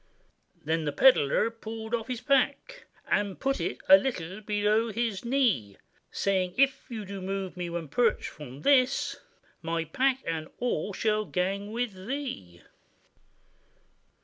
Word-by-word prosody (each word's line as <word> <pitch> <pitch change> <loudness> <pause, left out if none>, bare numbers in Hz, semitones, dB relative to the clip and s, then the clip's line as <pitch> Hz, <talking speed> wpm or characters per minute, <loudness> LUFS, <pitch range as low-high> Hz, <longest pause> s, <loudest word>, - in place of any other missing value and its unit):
Then 160 +1 0
the 145 - 0
pedlar 145 - +5
he 225 - +1
pulled 225 0 -7
off 230 -1 -1
his 250 -2 -4
pack, 280 - 0 0.2
And 200 -2 0
put 270 -8 0
it 165 - -2
a 190 - +10
little 195 -4 -4
below 210 +2 +1
his 225 -3 -2
knee, 235 - +1 0.3
Saying, 185 -2 0
'If 275 0 +2
you 220 -4 -5
do 195 0 -7
move 195 0 -4
me 175 -1 -4
one 170 -2 -4
perch 225 - +1
from 140 -2 -10
this, 265 - +3 0.4
My 165 0 -2
pack 265 - +1
and 160 -1 -3
all 210 -6 -1
shall 215 +1 0
gang 195 +3 -2
with 235 -1 -2
thee. 175 - -5
210 Hz, 145 wpm, -28 LUFS, 175-245 Hz, 0.4 s, a